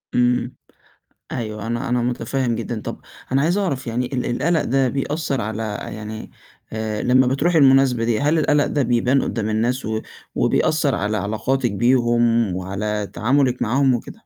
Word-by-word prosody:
إمم. 125 +1 +1 0.8
أيوه، 110 -3 -4
أنا 120 0 -2
أنا 120 -1 +1
متفهِّم 120 0 -1
جدًا. 115 -1 -4
طَب - - -6 0.3
أنا 135 +1 +3
عايز 175 +6 +1
أعرف 140 -10 -2
يعني 120 +2 -1
ال 125 - -1
القَلَق 165 0 +1
ده 135 +1 +2
بيأثّر 140 0 -2
على 110 +1 -3 0.2
يعني 110 +1 -7 0.4
آآ 110 -1 -3
لمّا 130 +1 +4
بتروحي 155 +6 +2
المناسبة 135 -4 +4
دي، 115 0 +1
هل 150 +3 +2
القَلَق 145 -1 +2
ده 145 - 0
بيبان 125 +3 +2
قُدّام 110 -2 -2
الناس 120 +4 0
و 110 0 -1 0.3
وبيأثّر 150 -4 +1
على 105 +2 -1
علاقاتِك 115 +4 -1
بيهم 120 -2 +2
وعلى 100 +3 -3
تعاملِك 125 +1 +1
معاهم 130 +3 +2
وكده؟ 120 - -5
120 Hz, 155 wpm, -21 LUFS, 110-135 Hz, 0.8 s, لمّا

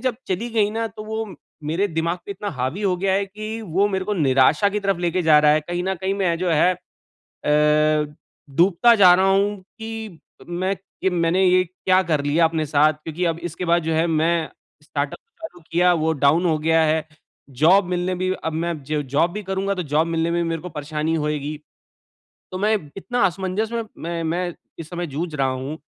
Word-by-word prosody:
जब 255 -1 -1
चली 200 +6 -2
गई 215 -2 +2
ना 225 +1 -2
तो 215 +1 -10
वो 220 -3 -4 0.3
मेरे 170 +7 +1
दिमाग 165 +1 -1
पे - - -7
इतना 205 +1 -5
हावी 135 +7 -3
हो 185 -2 +1
गया 190 +1 0
है 200 +1 +1
कि 215 +3 -6
वो 195 +2 +1
मेरे 190 -2 -2
को 210 +1 -1
निराशा 145 +4 +3
की 210 +1 -2
तरफ़ 195 -3 0
लेके 175 +1 0
जा 155 -2 +6
रहा 150 0 +5
है 155 - +3
कहीं 175 +3 -4
न 190 - 0
कहीं 190 +2 -2
मैं 185 -4 0
जो 180 0 0
है 165 +3 +4 0.7
ए, 150 0 +3 0.4
डूबता 190 - +5
जा 185 -4 +7
रहा 190 +2 +3
हूँ 200 +1 +2 0.2
कि 220 -5 -7 0.3
मैं 185 +3 -1
कि 190 0 -4
मैंने 175 +1 +1
ये 185 0 +4
क्या 185 +1 +1
कर 155 -5 0
लिया 160 +3 +3
अपने 160 -1 0
साथ 150 +1 +3
क्योंकि 165 +3 -3
अब 165 -1 -1
इसके 175 +1 -4
बाद 170 0 +2
जो 160 0 -1
है 160 +1 +2
मैं 165 0 +1 0.3
स्टार्टअप - - -3 0.2
चालू 325 - -9
किया 180 +1 +4
वो 160 -1 +1
डाउन 165 +6 +4
हो 160 -2 +2
गया 160 +1 +3
है। 155 0 +1 0.4
जॉब 170 +9 +4
मिलने 180 +1 -1
भी 185 +1 -1
अब 160 - -1
मैं 170 +2 -1
ज 150 -1 0
जॉब 165 +5 +2
भी 210 - -4
करूँगा 195 +1 -1
तो 180 - -3
जॉब 155 +2 +1
मिलने 165 0 0
में 170 - 0
भी - - -2
मेरे 165 -1 -3
को 180 - -7
परेशानी 150 +1 -3
होएगी। 150 -1 -2 0.9
तो 185 - -4
मैं 210 +3 +2 0.2
इतना 245 +6 -2
असमंजस 190 +4 -2
में 230 - -1 0.2
मैं 170 0 -3
मैं 175 +2 -2 0.3
इस 160 - -8
समय 175 -1 -4
जूझ 155 +4 -4
रहा 135 -2 +1
हूँ 130 +3 -4
175 Hz, 210 wpm, -22 LUFS, 155-195 Hz, 0.9 s, जा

